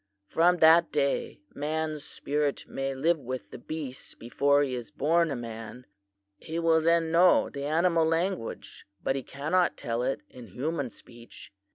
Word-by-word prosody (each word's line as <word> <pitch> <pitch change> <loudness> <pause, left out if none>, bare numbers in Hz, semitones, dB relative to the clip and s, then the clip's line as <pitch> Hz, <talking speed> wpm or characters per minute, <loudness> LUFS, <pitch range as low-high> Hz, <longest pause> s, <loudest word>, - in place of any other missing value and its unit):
From 175 - +3
that 165 0 +6
day, 140 -7 -1
man's 155 0 -3
spirit 145 0 -2
may 135 0 -3
live 160 +5 +2
with 130 -1 -6
the - - -8
beasts 140 -1 -7
before 140 +4 +2
he 135 -2 -2
is 120 -2 -5
born 165 +2 +2
a 140 - -2
man. 115 +1 -8 0.5
He 160 - -6
will 165 -1 +3
then 165 0 +2
know 175 +2 +5
the 140 -1 -5
animal 165 +1 +2
language 165 - -3 0.2
but 135 - 0
he 135 - -2
cannot 155 +8 0
tell 115 0 -2
it 130 +2 -1
in 125 -2 -12
human 140 - -3
speech. 115 -2 -14
145 Hz, 160 wpm, -28 LUFS, 130-165 Hz, 0.5 s, that